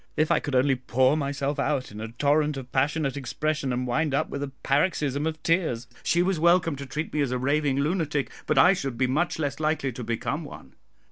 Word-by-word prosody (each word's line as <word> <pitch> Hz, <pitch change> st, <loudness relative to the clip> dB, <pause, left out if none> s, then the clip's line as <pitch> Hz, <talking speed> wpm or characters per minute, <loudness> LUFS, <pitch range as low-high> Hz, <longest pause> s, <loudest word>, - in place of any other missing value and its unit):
If 155 Hz, 0 st, +2 dB
I -, -, +4 dB
could 145 Hz, -3 st, -3 dB
only 135 Hz, +2 st, +4 dB
pour 130 Hz, +2 st, +2 dB
myself 140 Hz, -1 st, -2 dB
out 140 Hz, -5 st, -1 dB
in 105 Hz, +1 st, -8 dB
a 110 Hz, -, -4 dB
torrent 145 Hz, +5 st, +1 dB
of 130 Hz, -2 st, -8 dB
passionate 140 Hz, +1 st, 0 dB
expression, 145 Hz, +1 st, -2 dB
and 125 Hz, +1 st, -1 dB
wind 135 Hz, +4 st, 0 dB
up -, -, 0 dB
with 140 Hz, -, -4 dB
a 145 Hz, -, -2 dB, 0.2 s
paroxysm 145 Hz, -1 st, +1 dB
of 155 Hz, -1 st, -5 dB
tears, 165 Hz, -9 st, +1 dB, 0.2 s
she 175 Hz, +1 st, +2 dB
was 185 Hz, -2 st, 0 dB
welcome 170 Hz, -1 st, +3 dB
to 140 Hz, 0 st, -7 dB
treat 150 Hz, +4 st, -4 dB
me 150 Hz, -, +1 dB
as 140 Hz, -, +1 dB
a 125 Hz, -, -1 dB
raving 140 Hz, +1 st, +1 dB
lunatic, 150 Hz, -2 st, -1 dB, 0.2 s
but -, -, +1 dB
I 180 Hz, -, +7 dB
should 135 Hz, -9 st, -4 dB
be 130 Hz, -, +2 dB
much 150 Hz, +8 st, 0 dB
less 145 Hz, -2 st, -2 dB
likely 155 Hz, -3 st, 0 dB
to 125 Hz, +1 st, -7 dB
become 115 Hz, 0 st, -2 dB
one. -, -, -11 dB
140 Hz, 220 wpm, -26 LUFS, 130-155 Hz, 0.2 s, I